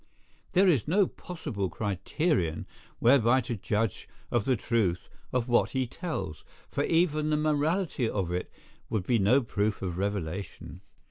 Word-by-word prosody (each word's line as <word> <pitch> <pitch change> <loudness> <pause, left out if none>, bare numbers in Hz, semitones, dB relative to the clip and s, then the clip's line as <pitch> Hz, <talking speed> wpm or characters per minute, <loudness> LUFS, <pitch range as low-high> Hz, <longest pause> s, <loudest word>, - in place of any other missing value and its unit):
There 190 +1 +5
is 145 - +3
no 190 +5 +4
possible 145 - -5
criterion 100 - -1 0.3
whereby 125 0 +5
to 120 0 -4
judge 105 +1 -2 0.2
of 120 -3 +1
the 130 - +3
truth 105 -6 0 0.2
of 125 -1 0
what 120 -1 +3
he 130 - +2
tells; 115 - -5 0.3
for - - 0
even 155 -2 +2
the 150 - +2
morality 155 - +1
of 95 -4 -2
it 90 +1 -3 0.4
would 100 -5 -1
be 120 +1 +2
no 115 +8 +4
proof 105 -2 -1
of 90 -1 -3
revelation. 95 -2 -4
115 Hz, 145 wpm, -29 LUFS, 100-150 Hz, 0.4 s, There